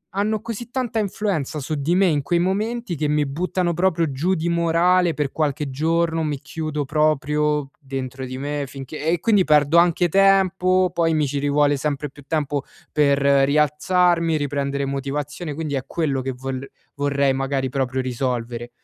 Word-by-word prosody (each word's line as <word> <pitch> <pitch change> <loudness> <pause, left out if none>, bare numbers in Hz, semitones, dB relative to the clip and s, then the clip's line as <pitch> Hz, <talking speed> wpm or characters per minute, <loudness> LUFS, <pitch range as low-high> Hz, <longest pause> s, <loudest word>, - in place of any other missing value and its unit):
hanno 210 +1 0
così 230 +1 -6
tanta 250 -3 -2
influenza 190 -8 -2
su 145 +3 -4
di 155 +4 0
me 195 - +4
in 150 -5 +2
quei 175 +4 0
momenti, 205 +2 -1
che 150 0 -1
mi 150 0 +1
buttano 175 +4 -1
proprio 170 -3 +1
giù 175 +8 0
di 165 +1 -2
morale 170 +1 +2
per 145 -3 -1
qualche 150 -2 -1
giorno, 165 +3 0
mi 150 -3 -2
chiudo 155 -1 -4
proprio 150 -1 +1
dentro 135 -2 -6
di 130 0 -6
me, 145 +1 -3
finché 135 +2 -8
e 170 +1 +2
quindi 210 -4 +3
perdo 150 0 +4
anche 175 0 +4
tempo, 185 -1 +3
poi 165 -2 +1
mi 155 -1 +2
ci 140 +1 -2
rivuole 145 0 +2
sempre 145 0 -3
più 145 - -15
tempo 145 -3 -1 0.3
per 145 -2 +3
rialzarmi, 150 +5 +3
riprendere 140 -1 -2
motivazione, 145 +3 -4
quindi 155 -2 -4
è 130 -2 -1
quello 140 -6 -1
che 130 +1 -3
vol 130 +1 -6 0.2
vorrei 140 -1 +1
magari 135 0 -1
proprio 130 0 -2
risolvere. 120 -2 -3
150 Hz, 165 wpm, -22 LUFS, 140-170 Hz, 0.3 s, me